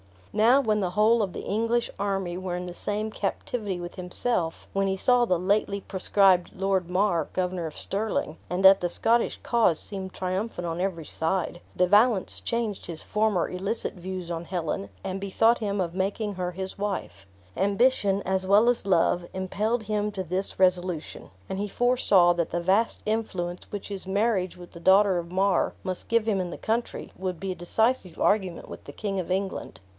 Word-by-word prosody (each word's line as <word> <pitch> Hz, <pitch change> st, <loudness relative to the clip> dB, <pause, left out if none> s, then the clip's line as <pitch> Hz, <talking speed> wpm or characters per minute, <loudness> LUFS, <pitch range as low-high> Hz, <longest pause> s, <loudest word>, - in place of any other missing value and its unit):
Now 235 Hz, +6 st, +5 dB
when 215 Hz, -4 st, +1 dB
the 185 Hz, -3 st, -1 dB
whole 220 Hz, +4 st, +4 dB
of 195 Hz, -4 st, -2 dB
the -, -, -6 dB
English 230 Hz, +3 st, 0 dB
army 195 Hz, -3 st, -1 dB
were 185 Hz, -1 st, -3 dB
in 180 Hz, 0 st, -4 dB
the 180 Hz, -, -6 dB
same 210 Hz, +4 st, -3 dB
captivity 205 Hz, -1 st, -3 dB
with 175 Hz, 0 st, -7 dB
himself, 180 Hz, -1 st, -1 dB
when 195 Hz, 0 st, 0 dB
he 190 Hz, -, 0 dB
saw 245 Hz, +5 st, +3 dB
the 185 Hz, -6 st, +2 dB
lately 200 Hz, +2 st, 0 dB
proscribed 190 Hz, -2 st, +3 dB
Lord 190 Hz, -2 st, 0 dB
Mar, 180 Hz, -4 st, +1 dB
Governor 180 Hz, -2 st, -1 dB
of 155 Hz, -, -9 dB
Stirling, 200 Hz, -5 st, -2 dB
and 180 Hz, +2 st, -1 dB
that 195 Hz, 0 st, +9 dB
the 175 Hz, -, -1 dB
Scottish 230 Hz, +6 st, +1 dB
cause 230 Hz, -9 st, +3 dB
seemed 190 Hz, 0 st, -5 dB
triumphant 185 Hz, 0 st, -3 dB
on 165 Hz, 0 st, -3 dB
every 180 Hz, -4 st, -2 dB
side, 175 Hz, +3 st, -2 dB, 0.2 s
De 180 Hz, -, +4 dB
Valence 205 Hz, +2 st, +3 dB
changed 230 Hz, -4 st, -2 dB
his 165 Hz, -2 st, -6 dB
former 210 Hz, -4 st, +1 dB
illicit 195 Hz, +5 st, -2 dB
views 180 Hz, -1 st, -6 dB
on 170 Hz, 0 st, -4 dB
Helen, 160 Hz, -, -3 dB
and 190 Hz, +1 st, -3 dB
bethought 225 Hz, +4 st, +3 dB
him 200 Hz, -2 st, -1 dB
of 170 Hz, -2 st, -2 dB
making 200 Hz, +3 st, -1 dB
her 180 Hz, -1 st, -3 dB
his 190 Hz, +2 st, -6 dB
wife. 195 Hz, -, -4 dB, 0.3 s
Ambition, 200 Hz, 0 st, +2 dB
as 190 Hz, 0 st, -1 dB
well 210 Hz, +5 st, +5 dB
as 240 Hz, -4 st, 0 dB
love, 175 Hz, -1 st, +2 dB
impelled 210 Hz, +5 st, -1 dB
him 210 Hz, 0 st, -1 dB
to 190 Hz, -, -3 dB
this 185 Hz, +3 st, -2 dB
resolution; 180 Hz, -3 st, 0 dB, 0.2 s
and 190 Hz, -, -3 dB
he 205 Hz, -, -1 dB
foresaw 205 Hz, -7 st, +4 dB
that 170 Hz, -1 st, -1 dB
the 175 Hz, -, -2 dB
vast 195 Hz, +6 st, +1 dB
influence 185 Hz, -5 st, -3 dB
which 205 Hz, -1 st, -6 dB
his 195 Hz, -2 st, -6 dB
marriage 195 Hz, -2 st, +1 dB
with 175 Hz, -1 st, -12 dB
the 170 Hz, -, -11 dB
daughter 190 Hz, +1 st, +5 dB
of 170 Hz, 0 st, -7 dB
Mar 190 Hz, 0 st, +2 dB
must 185 Hz, -1 st, -4 dB
give 230 Hz, -1 st, +2 dB
him 210 Hz, -3 st, +1 dB
in 180 Hz, -1 st, -2 dB
the -, -, -6 dB
country, 230 Hz, +2 st, -2 dB
would 185 Hz, -2 st, -3 dB
be 195 Hz, -1 st, -3 dB
a -, -, -4 dB
decisive 190 Hz, +1 st, 0 dB
argument 190 Hz, -4 st, +1 dB
with -, -, -10 dB
the -, -, -9 dB
King 200 Hz, -3 st, -3 dB
of 180 Hz, -, -4 dB
England. 190 Hz, +1 st, -3 dB
190 Hz, 190 wpm, -26 LUFS, 180-210 Hz, 0.3 s, that